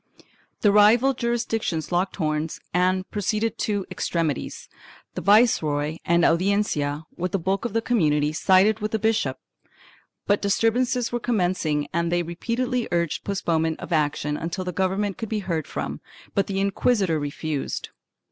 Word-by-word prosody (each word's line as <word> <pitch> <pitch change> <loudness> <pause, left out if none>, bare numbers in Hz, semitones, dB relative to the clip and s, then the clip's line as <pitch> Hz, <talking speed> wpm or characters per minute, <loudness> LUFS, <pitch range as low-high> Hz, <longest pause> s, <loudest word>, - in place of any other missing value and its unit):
The 205 - +5
rival 225 +6 +5
jurisdictions 225 - -2
locked 180 +2 0
horns 155 -2 -2
and 185 +1 +1
proceeded 215 +2 -1
to 205 -3 -1
extremities. 165 -5 -2 0.5
The - - -4
viceroy 160 -9 +3
and 170 0 +3
Audiencia, 165 -5 +1
with 180 0 -3
the - - +3
bulk 190 +4 -1
of 235 - -3
the 225 0 0
community, 150 -11 +2
sided 190 +6 +4
with 215 0 -3
the - - +3
bishop, 220 +1 0 0.9
but 205 0 +2
disturbances 230 +4 +1
were 240 - -1
commencing 180 -10 0
and 170 +1 0
they 175 0 +1
repeatedly 235 +8 -2
urged 170 -2 0
postponement 165 -5 -1
of 170 - -5
action 150 -1 0
until 170 +3 -4
the 180 - -2
govern 190 +3 0
ment 205 +2 -3
could 225 -3 -4
be 220 - -1
heard 160 -4 -2
from, - - -5 0.3
but 200 - +1
the 195 -1 -2
inquisitor 195 -3 +1
refused. 145 0 -4
190 Hz, 150 wpm, -24 LUFS, 160-215 Hz, 0.9 s, The